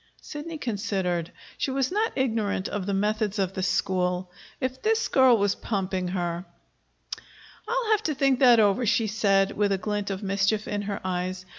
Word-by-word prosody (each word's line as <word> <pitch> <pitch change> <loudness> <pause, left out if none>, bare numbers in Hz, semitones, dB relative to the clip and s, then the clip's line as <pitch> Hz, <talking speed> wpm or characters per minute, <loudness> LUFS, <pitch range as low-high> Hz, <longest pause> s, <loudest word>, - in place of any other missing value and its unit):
Sidney 315 +2 -7
considered. 195 - -2 0.3
She - - 0
was 265 +1 0
not 430 +4 0
ignorant 220 -7 0
of 205 -2 -4
the 200 - 0
methods 210 +1 0
of 190 -1 0
the 190 - -3
school. 180 -1 0 0.3
If 260 -1 -3
this 445 +1 +1
girl 260 -3 +5
was 200 -1 +2
pumping 190 -3 -2
her 175 -1 -2 1.2
"I'll 475 -2 0
have 430 -1 +3
to 305 - 0
think 270 -1 +2
that 245 -3 +7
over," 210 +3 +3
she 220 +2 +2
said, 200 -2 +2
with 205 -1 0
a 195 - +2
glint 205 +1 -3
of 195 +1 -4
mischief 200 +2 0
in 205 -1 -2
her 200 0 -4
eyes. 185 0 -3
205 Hz, 175 wpm, -26 LUFS, 190-255 Hz, 1.2 s, that